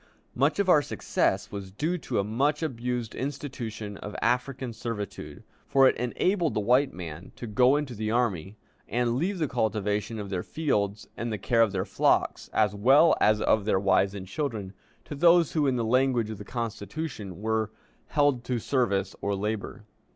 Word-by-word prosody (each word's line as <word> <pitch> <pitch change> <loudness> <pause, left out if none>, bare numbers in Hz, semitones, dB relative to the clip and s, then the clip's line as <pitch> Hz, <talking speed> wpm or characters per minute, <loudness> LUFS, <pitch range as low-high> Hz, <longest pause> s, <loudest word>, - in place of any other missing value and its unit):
Much 140 +4 +2
of 200 -1 +1
our 155 -5 +6
success - - -1
was 100 -2 -6
due 150 - -1
to 175 - -5
the 100 - +2
much 140 +9 0
abused 125 -5 -3
institution 125 -7 -5
of 105 - -8
African 125 0 -1
servitude, 110 -3 -6 0.2
for 135 -1 +5
it - - +3
enabled 165 - 0
the - - +2
white 125 +6 +3
men 85 -1 -8
to - - -7
go 125 +5 +4
into 145 -4 -2
the 110 -1 -3
army, 110 -5 -1 0.3
and 120 +1 +1
leave 180 +9 -1
the 160 -3 0
cultivation 105 -2 -1
of 100 -2 -6
their 90 -2 -1
fields 105 - -1
and 120 +1 -3
the 105 - -2
care 115 +4 +2
of 115 -3 +4
their 95 -1 -2
flocks, 95 - +1
as 105 -2 +2
well 135 +11 +5
as 105 0 +4
of 110 -2 +2
their 100 -3 +2
wives 100 0 +2
and 95 -2 -6
children, 105 -4 -3 0.3
to - - -7
those 170 +2 +5
who, 150 -3 +1
in 130 - +2
the 115 -2 0
language 125 -2 +2
of 105 - -7
the - - -7
Constitution, 110 - -5
were 110 0 0 0.4
"held 145 -5 +2
to 125 - -1
service 100 -6 0
or 100 0 0
labor." 105 +2 -4
115 Hz, 180 wpm, -27 LUFS, 105-135 Hz, 0.4 s, our